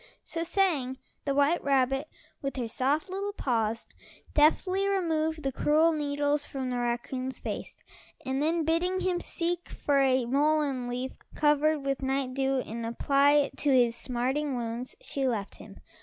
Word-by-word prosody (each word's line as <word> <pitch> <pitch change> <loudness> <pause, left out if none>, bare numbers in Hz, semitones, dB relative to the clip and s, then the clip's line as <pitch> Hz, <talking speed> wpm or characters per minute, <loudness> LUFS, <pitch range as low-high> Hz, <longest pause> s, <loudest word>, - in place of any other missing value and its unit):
So 330 - -4
saying, 325 -8 +1 0.3
the 275 -1 0
white 285 +5 +3
rabbit, 270 +1 +2 0.3
with 275 -1 -3
her 245 -3 -2
soft 275 - 0
little 395 +2 -3
paws, 225 - -1 0.5
deftly 370 +6 +3
removed 320 -5 0
the 270 - 0
cruel 310 +5 +3
needles 290 -1 0
from 265 -3 -4
the 245 - -1
raccoon's 250 +2 -3
face, - - -5 0.5
and 265 +1 -1
then 325 +1 +1
bidding 355 +4 +1
him 360 -1 0
seek 345 0 -2
for 285 -1 +1
a 260 -2 +3
mullein 280 -1 +1
leaf 250 +2 -3 0.2
covered 300 0 +3
with 275 0 -1
night 265 -1 -1
dew, 270 0 +1
and 230 0 -6
apply 275 +5 +3
it 290 -1 +2
to 290 - 0
his 245 -3 +4
smarting 260 +4 -1
wounds, 235 +1 -4
she 270 -1 -2
left 215 -5 -2
him. - - -13
280 Hz, 155 wpm, -28 LUFS, 255-310 Hz, 0.5 s, his